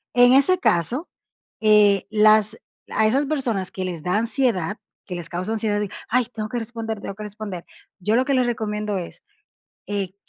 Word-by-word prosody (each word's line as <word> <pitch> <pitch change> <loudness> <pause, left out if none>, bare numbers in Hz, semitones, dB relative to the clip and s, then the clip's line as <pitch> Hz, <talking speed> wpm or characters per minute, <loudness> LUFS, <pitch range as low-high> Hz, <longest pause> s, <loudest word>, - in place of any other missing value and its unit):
En 245 0 +7
ese 280 +8 +5
caso, 255 - 0 0.5
eh, 210 -2 +5
las 215 0 +4 0.3
a 220 - +2
esas 270 +6 +2
personas 245 -11 -1
que 185 - -4
les 175 -3 -5
da 180 +3 +1
ansiedad, 225 -5 0 0.3
que 185 - -7
les 170 -2 -7
causa 180 +5 -3
ansiedad 215 -2 0
de: 205 -1 -2 0.2
"Ay, 250 +1 +2
tengo 215 -1 -4
que 245 - -3
responder, 225 -1 -5
tengo - - -5
que 215 - -8
responder". 205 -4 -7 0.4
Yo 210 +4 +1
lo 255 +2 +3
que 275 - 0
les 255 -2 +3
recomiendo 210 -3 -2
es, 175 -2 -7 0.7
eh, 200 -2 -3
215 Hz, 180 wpm, -22 LUFS, 200-240 Hz, 0.7 s, En